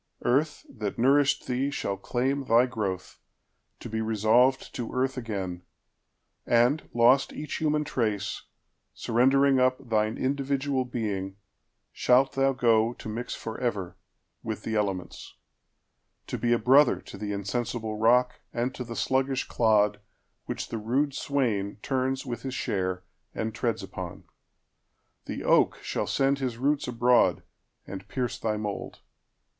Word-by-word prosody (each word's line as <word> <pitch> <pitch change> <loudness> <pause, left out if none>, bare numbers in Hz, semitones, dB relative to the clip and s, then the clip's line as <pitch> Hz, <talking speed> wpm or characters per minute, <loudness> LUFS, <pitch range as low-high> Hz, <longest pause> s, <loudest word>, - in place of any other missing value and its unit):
Earth, 150 +5 +1
that 105 -5 -5
nourished 140 +3 +3
thee, 130 +2 0
shall 100 -8 -2
claimThy 125 +3 +1
growth, 100 -7 -4 0.6
to - - -8
be 110 0 -2
resolved 115 +4 +2
to 120 -2 -4
earth 130 +1 0
again, 100 -8 -4 0.8
And, 120 +6 +2
lost 120 +3 +4
each 150 - -5
human 150 -1 +1
trace, 105 -8 -2 0.5
surrendering 135 +3 +3
upThine 125 -4 +1
individual 135 0 0
being, 100 -6 -3 0.6
shalt 130 +2 +3
thou 135 0 +2
goTo 115 -3 +1
mix 120 +2 -4
forever 110 -5 -3 0.5
with - - -5
the 110 - -3
elements; 100 -4 -3 0.9
To - - -4
be 120 - +1
a 120 - +5
brother 135 +6 +5
to - - -11
the 105 -1 -4
insensible 110 +2 -3
rock, 125 +3 +3
And 120 +2 -2
to 125 - -5
the 115 -1 -7
sluggish 130 +1 0
clod, 105 -2 +2 0.5
which - - -4
the 115 - -3
rude 130 +7 0
swainTurns 130 +1 -1
with 120 -3 -5
his 130 0 -5
share, 95 -4 -2 0.3
and 110 0 -2
treads 115 0 -1
upon. - - -7 1.0
The - - -5
oakShall - - +1
send 140 0 +2
his 125 -4 -2
roots 140 +3 0
abroad, 125 0 +3 0.4
and 95 0 -8
pierce 125 0 -3
thy 110 -1 -1
mould. 105 -1 -5
120 Hz, 130 wpm, -27 LUFS, 110-135 Hz, 1.0 s, a